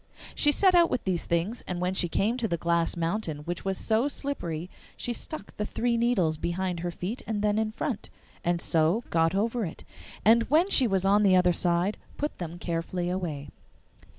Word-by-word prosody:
She 295 - +4
set 375 +4 +4
out 345 -1 +5
with - - -1
these 185 -3 -1
things, 170 +8 -1
and 180 -1 -3
when 180 +1 0
she 180 -2 +1
came 215 +7 +1
to 235 -3 0
the 170 - -1
glass 170 +1 0
mountain 165 -3 -2
which 175 +2 -4
was 195 -1 -1
so 225 +4 +1
slippery 175 - -4 0.3
she 245 - -3
stuck 270 -2 -7
the 210 - -1
three 240 0 0
needles 230 -10 +2
behind 175 +2 -2
her 175 +1 -2
feet 185 +8 -5
and 210 -2 -2
then 210 0 +2
in 220 -1 0
front, 230 0 -4 0.3
and 175 0 +1
so 165 +8 +2
got 165 +2 +2
over 225 +3 0
it, 165 - -6 0.4
and 230 +2 +5
when 335 +7 +3
she 260 - +5
was 195 -2 +1
on 200 +2 +4
the 195 -3 +5
other 180 -1 +4
side 175 +4 +1 0.2
put 295 +1 -3
them 170 -1 -5
carefully 175 +1 -2
away. 160 -6 -4
190 Hz, 200 wpm, -27 LUFS, 170-230 Hz, 0.4 s, out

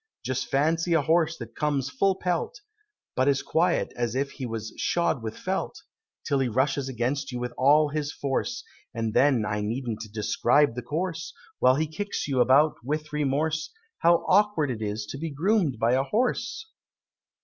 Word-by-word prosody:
Just 130 0 -2
fancy 165 +5 +1
a 160 -3 +3
horse 165 +1 +2
that 115 -1 -9
comes 145 -3 -1
full 190 +8 +2
pelt, 190 - -2 0.6
But 130 +1 +2
as 140 -1 +2
quiet 170 +2 +1
as 120 -1 -2
if 140 +1 -1
he 130 - -6
was 115 -1 -5
'shod 170 -7 0
with 110 -1 -5
felt,' - - -3 0.4
Till 140 - +1
he 135 - +1
rushes 130 +3 0
against 130 +3 -2
you 125 - -4
with 125 0 -4
all 145 +3 +4
his 145 -1 -2
force, 145 - -2 0.3
And 115 -1 -2
then 130 -5 +3
I 105 0 -2
needn't 115 0 -3
describe 120 +5 +2
the 125 - -4
course, 165 +5 -4 0.2
While 130 - +5
he 155 +3 +1
kicks 200 +5 -4
you 135 -3 +2
about 140 +3 +4
without 150 +3 -3
remorse, 150 +2 0 0.3
How 170 0 +4
awkward 195 -8 +3
it 110 -3 -5
is 105 0 -3
to 135 - -7
be 165 +1 -3
groom'd 165 - +1
by 115 +2 +2
a 130 - +3
horse! 245 - -1
140 Hz, 175 wpm, -26 LUFS, 125-160 Hz, 0.6 s, While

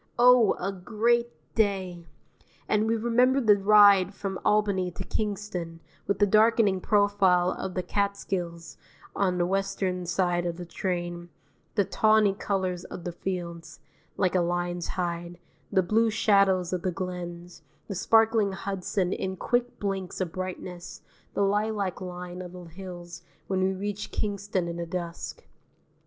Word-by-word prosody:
Oh, 245 -3 +6
a 195 +2 -1
great 230 +5 +1 0.2
day! 190 -5 -1 0.6
And 215 +1 +2
we 225 - +2
remember 245 +4 +3
the 215 -5 +5
ride 200 -1 +6
from 195 -2 -4
Albany 200 -3 +2
to 175 - -7
Kingston, 200 -6 -4 0.3
with 200 - +1
the 205 - +4
darkening 215 -2 +4
profile 195 -4 +3
of 185 - -5
the 185 - -1
Catskills 180 -3 -3 0.4
on 185 -2 +1
the 175 - +2
western 190 -1 -1
side 175 0 +1
of 170 -1 -3
the 175 - -6
train, 175 -1 -4 0.5
the 200 -3 +3
tawny 215 -1 +3
colours 190 -3 -2
of 175 - -8
the 175 - -3
fields 170 -3 -5 0.4
(like 185 -2 +1
a 185 - +3
lion's 175 0 -1
hide), 175 -1 -3 0.3
the 190 - +3
blue 225 +5 +2
shadows 195 -4 +3
of 180 - -1
the 185 - -1
glens, 175 -1 -6 0.3
the 200 - -4
sparkling 220 +1 +3
Hudson 190 0 -2
in 190 0 -3
quick 245 +4 -1
blinks 195 -3 -3
of 185 -3 -2
brightness, 185 -1 -6 0.3
the 200 - +2
lilac 205 -1 0
line 180 0 -6
of 180 -1 -8
the 180 -1 -9
hills 175 0 -9 0.2
when 190 -1 -1
we 190 +1 +2
reached 200 +2 -4
Kingston 200 -3 -2
in 170 0 -4
the 170 0 -4
dusk. 170 -1 -5
190 Hz, 145 wpm, -27 LUFS, 175-205 Hz, 0.6 s, Oh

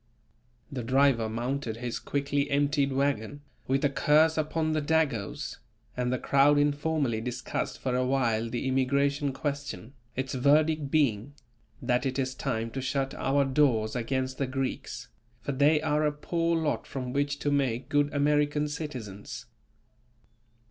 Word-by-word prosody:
The 130 -3 -3
driver 130 -2 +3
mounted 120 0 -3
his 120 0 -4
quickly 140 0 -1
emptied 140 0 +2
wagon, 140 0 -1 0.3
with 135 +2 +1
a - - +4
curse 155 +3 +4
upon 155 0 0
the 155 -1 +1
"Dagos," 145 - -1 0.4
and 125 0 -1
the 130 - +1
crowd 140 +3 +4
informally 145 -5 +1
discussed 125 +1 -3
for 130 -1 -2
a 130 - +2
while 120 -4 +1
the 120 +2 -3
immigration 140 +2 +1
question; 140 -5 -4 0.2
its 130 +1 -3
verdict 150 +2 +3
being, 140 -3 +1 0.5
that 125 +1 +1
it 130 - -3
is 130 -1 -1
time 115 -4 -2
to 135 - -4
shut 135 +1 -1
our 140 +1 +1
doors 130 -6 +2
against 130 +2 -2
the 135 - 0
Greeks, 135 0 -4 0.3
for - - -3
they 145 +3 +4
are 150 -1 +1
a 150 - +2
poor 165 +3 0
lot 160 -2 -1
from 125 -2 -5
which 145 0 0
to 145 0 -1
make 135 -4 0
good 145 0 +2
American 150 +1 +2
citizens. 130 -10 -6
140 Hz, 150 wpm, -28 LUFS, 125-145 Hz, 0.5 s, a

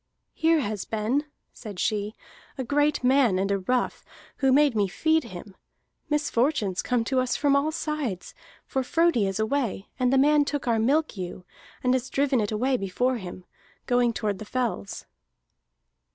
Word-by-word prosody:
"Here 320 -1 +3
has 210 -5 -3
been," 225 +7 -1 0.3
said 210 -5 -9
she, 210 +2 -1 0.4
"a 260 - -2
great 290 +2 +1
man 250 -6 +4
and 195 +1 0
a 200 - +1
rough, 245 +6 -1 0.3
who 270 -1 +2
made 285 -2 +4
me 205 -2 +2
feed 315 - +1
him. 190 -2 -10 0.5
Misfortunes 255 - +1
come 245 -2 0
to 260 +3 0
us 255 -1 0
from 285 -2 +2
all 285 +3 +2
sides, 300 - -3 0.3
for 265 - -1
Frodi 325 - +2
is 195 +1 -3
away, 220 -3 -1
and 250 -1 +2
the 270 - +4
man 295 +2 +5
took 285 -2 -3
our 230 -2 +2
milk 280 +3 +1
ewe, 180 0 -6 0.4
and 250 0 +3
has 260 0 -1
driven 270 -3 +1
it 210 - -2
away 255 +5 +1
before 245 +6 0
him, 185 -3 -9 0.4
going 245 -1 +2
toward 210 -3 -2
the - - -6
fells." 230 - -3
250 Hz, 165 wpm, -26 LUFS, 210-280 Hz, 0.5 s, man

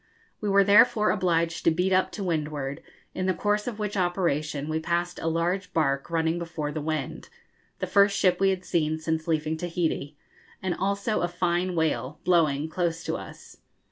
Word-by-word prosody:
We 210 - -2
were 200 0 +5
therefore 215 +2 +5
obliged 170 -4 0
to - - +5
beat 180 +4 +1
up 185 0 +2
to 205 - -4
windward, 150 -5 -2 0.3
in 185 0 -2
the 185 - +1
course 210 +3 0
of 235 -4 -3
which 210 -1 -3
operation 160 -6 0
we 155 0 -1
passed 175 +2 -2
a - - -3
large 175 +4 -1
barque 140 -3 0
running 165 0 0
before 165 -3 -4
the 155 - -4
wind 155 -2 -4 0.5
the - - -2
first 200 0 +4
ship 180 -2 +3
we 195 0 +4
had 185 -1 -2
seen 155 -2 0
since 160 0 -2
leaving 155 -1 0
Tahiti 160 -4 -2 0.4
and 185 -2 -1
also 200 +4 -1
a 175 - +1
fine 175 +1 -1
whale, 155 -3 -1
blowing, 155 -4 +2
close 165 0 -2
to - - -2
us. - - -10
170 Hz, 180 wpm, -26 LUFS, 155-185 Hz, 0.5 s, were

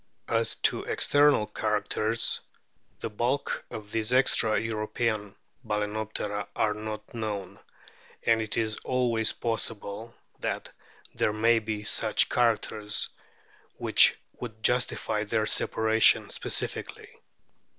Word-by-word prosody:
As 115 -1 +1
to - - +3
external 145 -6 +3
characters, 110 +1 0 0.6
the - - -3
bulk 120 +6 -1
of 105 -1 -8
these 110 +1 0
extra 125 -4 +4
European 110 -1 -2 0.3
Balanoptera 105 -1 -3
are 105 - +1
not 105 0 -7
known, 105 -4 -4 0.6
and 115 -1 +3
it 110 -2 -4
is 110 -2 -1
always 120 -3 +1
possible 115 -1 -4 0.2
that - - -3 0.4
there - - +1
may 115 +2 +4
be 110 -1 -4
such - - +3
characters 110 -3 +1 0.7
which - - +6 0.2
would 110 -2 -8
justify 120 -4 +1
their 110 0 0
separation 110 +1 +3
specifically. - - -4
110 Hz, 105 wpm, -28 LUFS, 105-115 Hz, 0.7 s, which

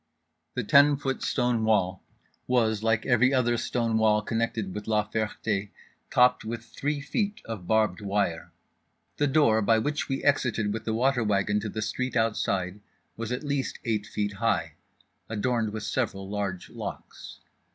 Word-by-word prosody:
The 125 - -1
ten 145 +6 +6
foot 135 -2 -3
stone 125 -3 +1
wall 100 -4 +1 0.5
was, 110 -4 +2
like 110 0 +1
every 125 0 +4
other 120 -2 +2
stone 115 -1 0
wall, 105 -1 +3
connected 110 -3 -2
with 105 0 -6
La 105 -1 +1
Ferté, 105 -2 -2 0.4
topped 125 0 +4
with 115 +1 -5
three 145 +5 -3
feet 205 +9 -2
of 105 -6 -6
barbed 110 -4 +2
wire. 100 -4 -1 0.7
The 145 - +2
door 135 -6 +4
by 110 +2 +4
which 145 +7 -1
we 135 - -2
exited 120 -7 +1
with 110 0 -5
the 110 - -1
water 125 +1 +2
wagon 105 0 +1
to 105 - -4
the 110 +1 -3
street 125 +4 -3
outside 100 -4 0 0.4
was 115 0 -5
at 125 +4 -2
least 140 -2 -2
eight 110 -3 -1
feet 105 -1 -2
high, 85 -9 +1 0.6
adorned 110 0 0
with 110 0 -5
several 100 -4 -2
large 100 -3 -4
locks. - - -8
110 Hz, 160 wpm, -27 LUFS, 105-125 Hz, 0.7 s, ten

